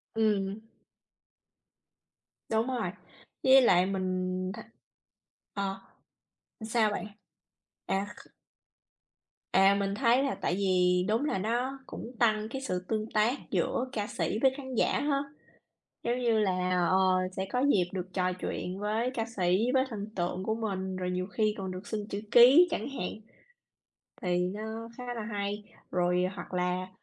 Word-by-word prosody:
Ừm. 205 -2 +1 1.9
Đúng 225 +2 +1
rồi, 235 -9 -1 0.5
với 265 0 +8
lại 180 -6 +5
mình 185 -1 -2
thấy 230 - -8 0.9
ờ, 195 -1 -3 0.8
sao 220 -1 +2
bạn? 205 - -3 0.8
À, 195 +1 0
kh - - -15 1.2
À, 195 +1 +5
mình 200 0 -1
thấy 245 +3 +3
là 275 - 0
tại 175 - 0
vì 180 -2 +2
đúng 225 +7 +1
là 245 - 0
nó 245 +7 -1
cũng 235 - -7
tăng 215 -2 +2
cái 270 +2 -5
sự 180 -8 -2
tương 215 0 -2
tác 215 +3 +3 0.2
giữa 250 - 0
ca 210 -5 -2
sĩ 215 - -2
với 265 -1 +5
khán 260 -2 -6
giả - - +2
ha. 285 -1 +1 0.8
Giống 240 +2 0
như 230 -3 +2
là, 185 -3 +1 0.2
ờ, 185 - +3 0.4
sẽ 190 - -1
có 250 - +1
dịp 205 -11 +3
được 185 -1 -3
trò 185 -1 +1
chuyện 185 +1 -4
với 220 +4 0
ca 225 -2 -1
sĩ, 210 +2 +1
với 260 -1 +4
thần 210 -2 -5
tượng 180 +1 -2
của 220 +2 0
mình, 190 -4 -3
rồi 180 -1 -2
nhiều 180 +1 -2
khi 215 +1 0
còn 190 -1 -4
được 185 +2 -7
xin 210 -1 -3
chữ 200 +1 -3
ký 260 +10 +8
chẳng 335 - -2
hạn, 180 -10 -3 1.1
thì 180 -1 +1 0.2
nó 220 +2 -6
khá 250 - -7
là 225 - -4
hay. 205 -1 -3 0.3
Rồi, 180 0 +2
hoặc 175 0 -8
là, 180 +1 -1
210 Hz, 155 wpm, -30 LUFS, 185-230 Hz, 1.9 s, với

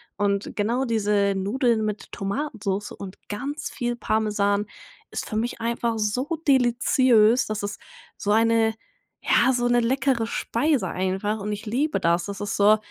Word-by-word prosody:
Und 200 0 0
genau 235 +6 0
diese 205 -3 +1
Nudeln 225 +3 +1
mit 215 -1 -4
Tomatensoße 205 -2 -3
und 195 -1 -9
ganz 280 +9 -4
viel 240 -2 -2
Parmesan 210 -3 0 0.4
ist - - -5
für 215 - -3
mich 235 +2 -2
einfach 230 0 -1
so 250 +10 -1
deliziös, 245 -2 +4
das 215 -1 -3
ist 205 +9 -5 0.3
so 205 - -5
eine 225 +1 +3 0.5
ja, 255 +2 +4
so 245 0 +1
'ne 240 0 +3
leckere 245 -1 +1
Speise 235 -1 0
einfach 190 +3 -1
und 210 +1 -4
ich 210 +2 -5
liebe 275 +8 0
das. 170 +1 +1
Das 200 0 -6
ist 205 - -2
so, 210 +1 +5
220 Hz, 155 wpm, -24 LUFS, 205-240 Hz, 0.5 s, so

